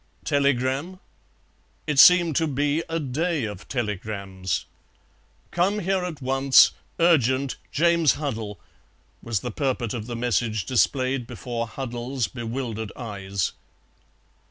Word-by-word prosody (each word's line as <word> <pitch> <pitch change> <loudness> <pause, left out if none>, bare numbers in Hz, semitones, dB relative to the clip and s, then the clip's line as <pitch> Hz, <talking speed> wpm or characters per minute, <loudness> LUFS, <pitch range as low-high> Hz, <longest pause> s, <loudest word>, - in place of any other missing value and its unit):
Telegram? 140 +4 0 0.9
It 150 -3 0
seemed 175 -1 +7
to 160 - +2
be 145 +2 0
a 165 0 -1
day 155 +2 -1
of 105 -2 -6
telegrams. 100 -6 -3 0.9
"Come 185 +4 +1
here 190 -1 0
at 160 -6 -6
once. 135 +1 +5 0.3
Urgent. 140 -6 +3
James 170 -1 +3
Huddle," 110 -8 -4 0.6
was 115 -5 -2
the 125 - -4
purport 130 -3 -1
of 115 -2 -5
the 120 - -4
message 115 -3 0
displayed 130 0 +1
before 120 -1 -4
Huddle's 120 0 -3
bewildered 115 +1 -5
eyes. 100 -5 -3
130 Hz, 110 wpm, -24 LUFS, 115-150 Hz, 0.9 s, seemed